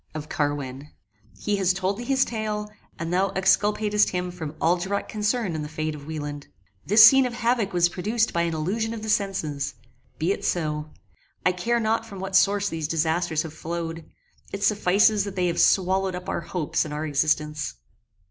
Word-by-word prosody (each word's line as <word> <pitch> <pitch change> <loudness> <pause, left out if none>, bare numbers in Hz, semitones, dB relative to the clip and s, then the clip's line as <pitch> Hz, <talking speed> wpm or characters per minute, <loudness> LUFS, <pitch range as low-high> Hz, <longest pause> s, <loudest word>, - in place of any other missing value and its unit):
of 155 -1 -5
Carwin. 145 -1 -3 0.5
He 205 -1 -1
has 190 -2 +2
told 190 +2 -1
thee - - -4
his 265 +1 +2
tale, 215 -2 -3 0.3
and 165 +1 -4
thou 190 +2 +2
exculpatest 210 +2 +2
him 180 0 -3
from 160 -3 -7
all 170 +2 +3
direct 190 +3 -3
concern 210 -2 -1
in 155 - -3
the 150 - -5
fate 155 0 -3
of 145 -1 -10
Wieland. 145 -2 -5 0.4
This 215 +3 +8
scene 265 +3 +7
of 240 - -6
havock 235 -4 +1
was 175 -1 +3
produced 215 +6 -1
by 170 - +1
an 170 -1 -1
illusion 220 +8 -2
of 215 - -7
the 220 - -4
senses. 155 -9 -1 0.4
Be 165 +4 0
it - - -3
so: 150 -3 -1 0.6
I 185 - +5
care 230 +7 0
not 225 0 +1
from 200 -3 -9
what 190 0 -4
source 200 +1 +4
these 160 -5 -3
disasters 160 0 0
have 160 -2 -8
flowed; 165 0 -5 0.5
it 200 0 -4
suffices 205 +1 +3
that 200 -1 -6
they 180 -1 +1
have 170 -1 0
swallowed 190 0 +2
up 180 0 -7
our - - -2
hopes 165 -1 -1
and 155 - -7
our 150 +1 -3
existence. 150 - 0
180 Hz, 190 wpm, -25 LUFS, 155-210 Hz, 0.6 s, This